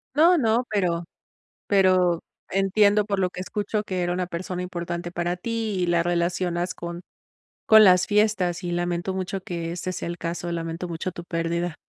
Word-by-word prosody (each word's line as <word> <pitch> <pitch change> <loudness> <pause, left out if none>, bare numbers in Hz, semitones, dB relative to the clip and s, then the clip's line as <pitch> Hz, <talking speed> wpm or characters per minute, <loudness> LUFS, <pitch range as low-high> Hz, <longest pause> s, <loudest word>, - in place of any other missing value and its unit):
No, 335 +4 +6
no, 230 -2 +2
pero 175 -5 0 0.6
pero 185 -3 +4 0.3
entiendo, 200 +2 +3
por 200 -2 -1
lo 185 -1 +1
que 180 - -8
escucho, 210 +2 -2
que 185 -3 -2
era 175 0 0
una 180 0 -1
persona 180 +1 -4
importante 175 -1 -4
para 175 0 -2
ti 225 +1 -3
y - - +1
la 170 -1 +2
relacionas 175 +1 -1
con 170 0 -7 0.6
con 220 0 +8
las 180 -3 +6
fiestas, 205 -4 +1
y 175 - -3
lamento 175 +1 -1
mucho 190 +1 -3
que 170 -2 -4
ese 185 +1 -4
sea 185 - -5
el 170 0 -4
caso, 170 +1 -4
lamento 165 +1 -4
mucho 170 +2 -4
tu 175 0 -9
pérdida. 170 0 -2
180 Hz, 175 wpm, -24 LUFS, 170-195 Hz, 0.6 s, con